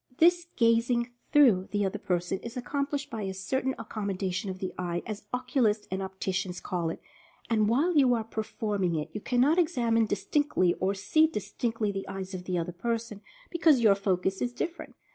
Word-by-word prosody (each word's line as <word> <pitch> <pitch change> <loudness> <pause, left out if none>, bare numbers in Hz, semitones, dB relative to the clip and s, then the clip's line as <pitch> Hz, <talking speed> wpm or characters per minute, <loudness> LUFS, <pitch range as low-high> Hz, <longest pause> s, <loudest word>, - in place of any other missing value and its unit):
This 345 +1 +4
"gazing 235 +1 +2 0.2
through" 230 -11 +5
the 205 -1 0
other 190 - -2
person 180 +1 -1
is 235 +2 -8
accom 280 +3 -2
plished 285 -1 -4
by 225 - -4
a 190 -1 -3
certain 260 +8 -1
"accommodation" 200 -3 -3
of 185 - -4
the 185 0 -4
eye, 175 -1 -3
as 215 -2 -6
oculists 250 -4 +1
and 190 +1 -2
opticians 190 -1 -3
call 175 -3 -2
it, - - -5 0.5
and 215 -2 +3
while 310 +9 +2
you 260 -4 +5
are 225 - -1
per 220 0 -4
forming 205 -5 -1
it 155 +1 -3
you 210 - -5
cannot 265 - +3
examine 235 -10 +2
distinctly, 205 - +1
or 195 +2 +1
"see" 310 +11 +3
distinctly 225 -5 -2
the 195 -1 -5
eyes 195 0 -6
of 180 -1 -6
the 180 -1 -1
other 170 +1 -2
person, 225 +2 -3 0.3
because 320 -7 +4
your 215 -3 +6
focus 190 -1 -1
is 245 0 -1
different. 335 +7 -5
215 Hz, 185 wpm, -28 LUFS, 190-250 Hz, 0.5 s, your